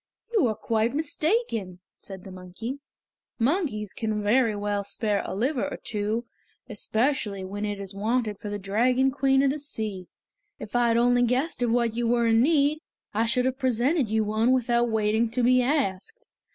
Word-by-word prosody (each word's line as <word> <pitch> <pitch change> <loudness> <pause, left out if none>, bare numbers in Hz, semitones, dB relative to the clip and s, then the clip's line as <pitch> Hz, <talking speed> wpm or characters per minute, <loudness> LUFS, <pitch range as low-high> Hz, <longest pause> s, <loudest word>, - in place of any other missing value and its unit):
"You 400 - +4
are 215 - -1
quite 225 +3 0
mistaken," 300 - -1 0.2
said 190 -2 -10
the 195 - -10
monkey. 185 +9 -7 0.6
"Monkeys 240 - 0
can 215 -2 -2
very 225 +1 +3
well 205 0 -2
spare 205 0 -1
a - - -5
liver 255 +6 0
or - - -6
two, 215 +3 -3 0.4
especially 220 -2 -1
when 205 +2 -4
it 205 -1 -3
is 195 0 -5
wanted 215 +1 -1
for 210 - -6
the 205 - -3
Dragon 245 +7 +2
Queen 270 0 +2
of 275 - +3
the 300 - -4
Sea. 215 -10 -5 0.5
If 215 - -9
I 240 0 +3
had 230 0 +3
only 245 +1 +4
guessed 250 +4 0
of 240 - +2
what 235 -1 +1
you 240 0 0
were 235 0 +2
in 225 0 +4
need, 295 +1 +3 0.3
I 225 +2 +1
should 250 +2 +1
have 260 +1 -1
presented 260 +1 +1
you 220 0 +1
with 210 - -4
one 220 +3 +2
without 240 -1 +2
waiting 220 +1 +1
to 245 +2 -1
be 255 +1 +5
asked. 280 - -2
230 Hz, 185 wpm, -26 LUFS, 210-260 Hz, 0.6 s, be